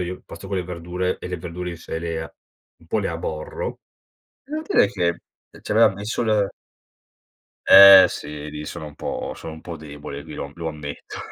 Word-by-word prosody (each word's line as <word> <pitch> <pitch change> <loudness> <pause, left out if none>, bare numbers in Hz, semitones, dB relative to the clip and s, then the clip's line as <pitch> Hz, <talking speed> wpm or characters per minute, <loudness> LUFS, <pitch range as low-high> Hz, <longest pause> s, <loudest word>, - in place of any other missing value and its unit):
io 90 +1 -4
pasta 95 - -10
con 95 - -3
le 90 - -1
verdure 90 +1 -3
e - - -7
le 90 - -3
verdure 90 +1 -6
in 85 - -7
sé 80 0 -6
le 80 -1 -5 0.4
un 80 - -21
po' 95 - 0
le 105 - -1
aborro. 485 0 -5 0.6
Devo 305 +2 -5
dire 100 - +4
che 85 -4 0 0.4
e - - -13
ci - - -10
avea 110 +1 +6
messo 100 +5 -3
l 105 -3 +1 1.2
Eh 100 -1 +11
sì, 75 0 -7
lì 75 0 -7
sono 75 - -7
un 75 - -10
po' - - -4
sono 80 - -8
un 80 - -12
po' 85 -2 -7
debole, 75 -2 -8
qui - - -10
lo - - -4
am 70 - -10
lo 85 -1 -4
ammetto 75 -2 -7
85 Hz, 200 wpm, -23 LUFS, 80-100 Hz, 1.2 s, Eh